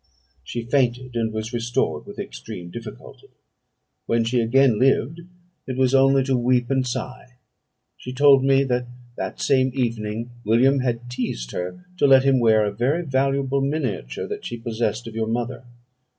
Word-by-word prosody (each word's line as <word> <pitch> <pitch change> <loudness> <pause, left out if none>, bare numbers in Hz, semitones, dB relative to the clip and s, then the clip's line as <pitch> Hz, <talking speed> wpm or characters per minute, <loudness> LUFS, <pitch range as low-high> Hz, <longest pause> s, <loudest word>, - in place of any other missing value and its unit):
"She 120 +11 -5
fainted, 125 0 0
and 115 -1 0
was 110 +2 -5
restored 115 -10 -1
with - - -10
extreme 85 +8 -8
difficulty. 115 0 -10 0.8
When 115 0 +2
she 120 +2 +1
again 120 0 +3
lived, 135 +5 +2 0.5
it 130 -1 -4
was 130 0 +2
only 135 0 +5
to 135 0 0
weep 125 0 +1
and 130 -1 +1
sigh. 125 0 -6 0.6
She 125 - -8
told 135 0 +5
me, 135 0 +4
that 125 -2 -1 0.3
that - - -5
same 130 -1 +2
evening 115 -2 -2
William 125 +6 +3
had 120 -1 -2
teased - - -4
her 90 - -5
to 145 - +4
let 135 -1 +6
him 135 -1 +3
wear 110 -2 +4
a 105 - -1
very 130 +11 0
valuable 135 0 0
miniature 130 - -2
that - - -6
she 120 - -5
possessed 115 -1 -2
of 115 - -8
your 110 0 -2
mother. 120 +2 -3
125 Hz, 165 wpm, -23 LUFS, 115-135 Hz, 0.8 s, let